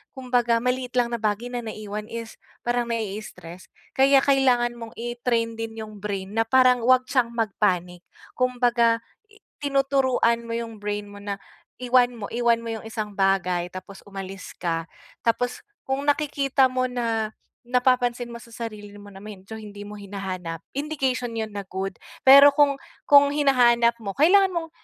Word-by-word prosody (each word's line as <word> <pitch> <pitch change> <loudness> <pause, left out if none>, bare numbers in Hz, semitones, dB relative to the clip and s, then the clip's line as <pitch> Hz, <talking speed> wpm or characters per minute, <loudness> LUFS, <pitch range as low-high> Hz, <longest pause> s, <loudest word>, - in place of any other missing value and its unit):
kumbaga 245 -3 +1
maliit 250 0 -2
lang 240 -1 +1
na 235 - -3
bagay 220 +3 -2
na 245 - -2
naiwan 215 -1 -6
is 230 -1 -7 0.3
parang 240 0 0
nai-stress, 205 -5 -6 0.2
kaya 270 0 +5
kailangan 255 -3 +3
mong 230 -1 -10
i-train 235 -1 -1
din 225 0 -5
'yung 215 -2 -10
brain 195 -1 -4
na 225 +1 +2
parang 255 -2 +5
huwag 255 +1 +4
siyang 250 -3 +1
mag-panic. 185 -5 0 0.3
Kumbaga 245 -2 +2 0.6
tinuturuan 270 -4 +1
mo - - -2
'yung 225 -3 -7
brain 205 0 -3
mo 205 0 -11
na 200 -1 -4 0.4
iwan 250 0 +3
mo 205 - -5
iwan 235 -1 +2
mo 230 - -6
'yung 220 - -7
isang 215 -2 -5
bagay 185 -3 +1
tapos 185 +2 -10
umalis 195 -1 -8
ka, 165 -2 -2 0.4
tapos 245 +2 -1 0.2
kung 265 +1 -1
nakikita 280 -2 +2
mo 255 0 -1
na, 230 -3 -1 0.3
napapansin 245 0 +1
mo 235 -1 -9
sa 230 - -17
sarili 215 -3 -7
mo 205 - -13
na 195 +1 -12
medyo 210 0 -10
hindi 205 -1 -9
mo 210 - -8
hinahanap 190 -4 -6 0.2
indication 265 -4 -2
'yun 220 -1 -4
na 200 - -4
good. 190 +1 -4 0.3
Pero 280 +2 +10
kung 285 -1 +3 0.3
kung 285 0 +7
hinahanap 245 -5 +4
mo 200 - -3
kailangan 380 +5 +5
mong 335 -2 -3
235 Hz, 155 wpm, -24 LUFS, 205-255 Hz, 0.6 s, Pero